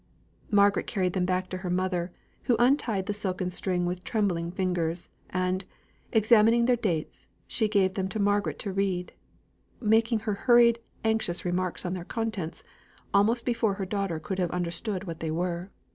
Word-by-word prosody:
Margaret 200 Hz, -1 st, +3 dB
carried 185 Hz, -3 st, 0 dB
them 185 Hz, -2 st, +1 dB
back 185 Hz, 0 st, 0 dB
to 185 Hz, -, -4 dB
her 185 Hz, -1 st, -4 dB
mother, 180 Hz, -1 st, -1 dB, 0.3 s
who 240 Hz, -, +3 dB
untied 240 Hz, -5 st, +2 dB
the 205 Hz, -, -1 dB
silken 185 Hz, -3 st, -2 dB
string 180 Hz, -1 st, -1 dB
with 180 Hz, +1 st, -3 dB
trembling 185 Hz, -7 st, 0 dB
fingers, 175 Hz, -2 st, -1 dB, 0.2 s
and, 185 Hz, +1 st, -1 dB, 0.5 s
examining 225 Hz, +1 st, +5 dB
their 250 Hz, 0 st, +4 dB
dates, 175 Hz, -9 st, -3 dB, 0.2 s
she 220 Hz, -, +1 dB
gave 195 Hz, -3 st, +2 dB
them 190 Hz, -1 st, -1 dB
to 220 Hz, -, -4 dB
Margaret 205 Hz, 0 st, +1 dB
to 200 Hz, -, -3 dB
read, 190 Hz, -2 st, -1 dB, 0.7 s
making 225 Hz, 0 st, +2 dB
her 210 Hz, -1 st, -1 dB
hurried, 235 Hz, +2 st, +5 dB, 0.3 s
anxious 220 Hz, -6 st, 0 dB
remarks 180 Hz, 0 st, -1 dB
on 180 Hz, -, -1 dB
their 180 Hz, -2 st, -4 dB
contents, 215 Hz, -5 st, -4 dB, 0.5 s
almost 225 Hz, +4 st, +3 dB
before 230 Hz, -4 st, +1 dB
her 195 Hz, -1 st, -3 dB
daughter 195 Hz, -4 st, -2 dB
could 170 Hz, +5 st, -4 dB
have 180 Hz, -2 st, +1 dB
understood 180 Hz, +3 st, -1 dB
what 165 Hz, -4 st, -6 dB
they 160 Hz, -, -3 dB
were. 175 Hz, +3 st, -2 dB
190 Hz, 165 wpm, -28 LUFS, 180-215 Hz, 0.7 s, examining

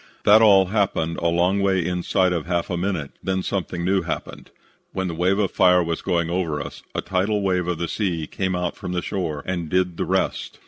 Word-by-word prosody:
"That 110 Hz, +2 st, +7 dB
all 100 Hz, -3 st, +6 dB
happened 95 Hz, -5 st, 0 dB
a 85 Hz, -, 0 dB
long 90 Hz, +4 st, +2 dB
way 95 Hz, -3 st, +1 dB
inside 90 Hz, +1 st, +1 dB
of 85 Hz, -2 st, -3 dB
half 85 Hz, 0 st, -1 dB
a -, -, 0 dB
minute; 90 Hz, -5 st, -2 dB
then 95 Hz, -1 st, -1 dB
something 90 Hz, -3 st, -3 dB
new 95 Hz, +1 st, +2 dB
happened. 85 Hz, -, -6 dB, 0.4 s
When 95 Hz, -1 st, -2 dB
the 85 Hz, -, -3 dB
wave 90 Hz, +4 st, +1 dB
of 100 Hz, -3 st, +1 dB
fire 90 Hz, -1 st, +4 dB
was 85 Hz, -1 st, -3 dB
going 85 Hz, -3 st, 0 dB
over 85 Hz, -4 st, -1 dB
us, 70 Hz, -, -7 dB
a -, -, 0 dB
tidal 100 Hz, +2 st, 0 dB
wave 90 Hz, -2 st, 0 dB
of 90 Hz, -2 st, -1 dB
the 85 Hz, +1 st, -2 dB
sea 85 Hz, -5 st, -2 dB
came 95 Hz, +3 st, -2 dB
out 90 Hz, -1 st, -2 dB
from 90 Hz, -, -6 dB
the 90 Hz, -, -1 dB
shore 80 Hz, -7 st, -3 dB
and 85 Hz, -4 st, -3 dB
did 90 Hz, -1 st, 0 dB
the -, -, -1 dB
rest. -, -, -1 dB
90 Hz, 220 wpm, -23 LUFS, 85-95 Hz, 0.4 s, That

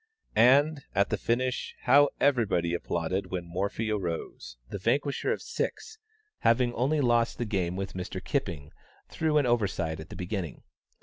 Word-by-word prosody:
And, 140 Hz, +5 st, +5 dB
at 100 Hz, +1 st, +2 dB
the -, -, +3 dB
finish, 125 Hz, +2 st, -1 dB
how 140 Hz, +3 st, +6 dB
everybody 105 Hz, -11 st, +2 dB
applauded 85 Hz, +2 st, -2 dB
when 90 Hz, -2 st, -3 dB
Morphy 100 Hz, +5 st, -2 dB
arose, 85 Hz, -, -4 dB
the 100 Hz, -, -6 dB
vanquisher 140 Hz, +8 st, 0 dB
of -, -, -2 dB
six, 455 Hz, -1 st, -4 dB, 0.4 s
having 120 Hz, +1 st, +3 dB
only 140 Hz, +6 st, +1 dB
lost 120 Hz, -2 st, +2 dB
the 120 Hz, -, -2 dB
game 95 Hz, -5 st, -1 dB
with 95 Hz, 0 st, -4 dB
Mr. 90 Hz, -1 st, -5 dB
Kipping 75 Hz, -3 st, -3 dB, 0.4 s
through 155 Hz, -1 st, +1 dB
an 145 Hz, -, +3 dB
oversight 95 Hz, -9 st, 0 dB
at 80 Hz, -, -9 dB
the -, -, -8 dB
beginning. 90 Hz, -, -4 dB
110 Hz, 150 wpm, -28 LUFS, 90-130 Hz, 0.4 s, how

